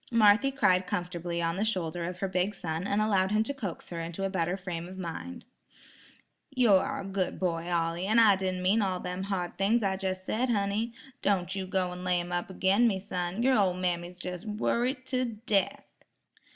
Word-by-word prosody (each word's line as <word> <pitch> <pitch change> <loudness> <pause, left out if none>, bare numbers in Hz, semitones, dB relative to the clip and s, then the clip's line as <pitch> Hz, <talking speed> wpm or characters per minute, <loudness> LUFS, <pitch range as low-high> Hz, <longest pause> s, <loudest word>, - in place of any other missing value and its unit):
Marthy 225 +2 +5
cried 190 -9 +2
comfortably 175 -1 -3
on 165 +1 0
the 205 - +1
shoulder 175 -6 -1
of 180 +1 -6
her 195 - +1
big 190 +2 0
son 165 +2 -3
and 205 +1 +2
allowed 190 -3 +2
him 215 +1 +2
to 280 - -3
coax 205 -11 -6
her 170 - -5
into 170 +3 -5
a 195 - -1
better 180 0 0
frame 175 -3 -5
of 185 +1 -10
mind. 190 +8 -6 1.0
"You 255 -6 +3
are 190 - +2
a - - -7
good 195 -2 -2
boy, 170 -2 -1
Ollie, 170 +2 0
and 220 +3 +5
I 215 -3 +7
didn't 185 -1 -2
mean 200 +5 +3
all 185 -2 0
them 180 +1 -4
hard 185 -3 -3
things 215 +4 +3
I 190 -1 0
jes' 185 -1 -2
said, 240 +6 -1
honey. 210 +1 0 0.3
Don' 190 -3 +2
you 190 -1 -3
go 185 -1 0
an' 180 0 -7
lay 180 -1 +2
'em 175 0 -5
up 175 +1 -2
agin 190 +5 +3
me, 200 -4 +1
son; 185 +2 -3
your 260 0 +4
ol' 190 -4 +3
mammy's 180 0 -3
jes' 180 -1 -5
worrited 240 +4 -1
to 255 -1 0 0.2
death." 195 -3 +1
190 Hz, 205 wpm, -29 LUFS, 180-210 Hz, 1.0 s, I